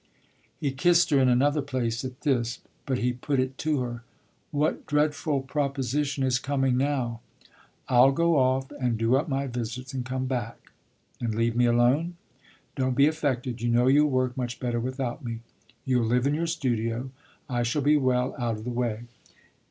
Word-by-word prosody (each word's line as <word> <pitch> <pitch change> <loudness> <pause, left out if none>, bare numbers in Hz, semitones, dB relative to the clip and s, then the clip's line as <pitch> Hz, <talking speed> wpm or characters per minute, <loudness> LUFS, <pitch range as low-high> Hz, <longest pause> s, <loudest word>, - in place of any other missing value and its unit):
He 140 - -1
kissed 170 +5 +3
her 140 - +5
in 130 -1 +4
another 145 +4 +3
place 125 -4 -2
at 130 +1 -7
this; 120 -5 0 0.3
but 130 -2 0
he 125 0 0
put 135 +3 -2
it 130 0 -1
to 155 -4 0
her; 120 -1 -4 0.5
"What 150 +1 -1
dreadful 150 -1 +1
proposition 140 0 -1
is 130 -2 +2
coming 135 0 0
now?" 130 -4 -1 0.7
"I'll 130 +1 +6
go 170 +3 +2
off 130 0 +1
and 125 -5 -1
do 115 +3 +2
up 145 +4 0
my 135 0 -1
visits 125 +1 -5
and 130 -2 -2
come 130 +1 -3
back." 120 -4 -4 0.5
"And 115 -3 -2
leave 115 +1 +1
me 120 0 +3
alone?" 125 +9 +2 0.6
"Don't 130 -1 0
be 140 - +5
affected! 135 -6 -1
You 120 - 0
know 120 +1 +3
you'll 145 +3 +5
work 130 -2 0
much 125 -2 -4
better 120 -2 -1
without 130 0 -3
me. 115 -2 -5 0.4
You'll 125 -3 +2
live 125 +2 +2
in 140 - +2
your 165 +3 -1
studio 125 -5 -2 0.4
I 120 -3 -1
shall 120 +5 0
be 150 +2 +4
well 130 -2 +1
out 115 -3 -1
of 110 - -9
the 125 - -4
way." 120 -2 -2
130 Hz, 180 wpm, -26 LUFS, 120-140 Hz, 0.7 s, I'll